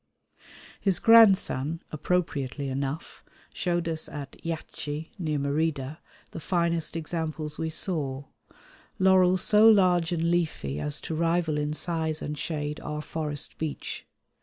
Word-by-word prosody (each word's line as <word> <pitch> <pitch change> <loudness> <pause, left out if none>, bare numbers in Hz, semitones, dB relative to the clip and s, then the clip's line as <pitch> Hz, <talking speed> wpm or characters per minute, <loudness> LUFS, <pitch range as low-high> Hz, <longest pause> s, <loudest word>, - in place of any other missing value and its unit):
His 195 -4 +2
grandson, 190 - +5
appropriately 145 -4 -1
enough, 135 +4 -4 0.3
showed 175 -2 -1
us 160 -1 -2
at 140 -2 -7
Yaxche 160 -1 -4
near 155 -4 -1
Merida 145 0 -1 0.3
the - - -6
finest 170 -1 0
examples 155 -2 -4
we 160 - -1
saw, 145 -5 -2 0.7
laurels 185 -1 +4
so 215 +1 +6
large 180 -5 +4
and 170 0 +1
leafy 150 - -1
as 75 0 -1
to - - -5
rival 165 -1 +1
in 150 0 -1
size 160 -1 0
and 150 - -4
shade 150 -1 -3
our 150 0 -5
forest 150 -3 -5
beech. 155 -2 -5
160 Hz, 125 wpm, -27 LUFS, 150-175 Hz, 0.7 s, so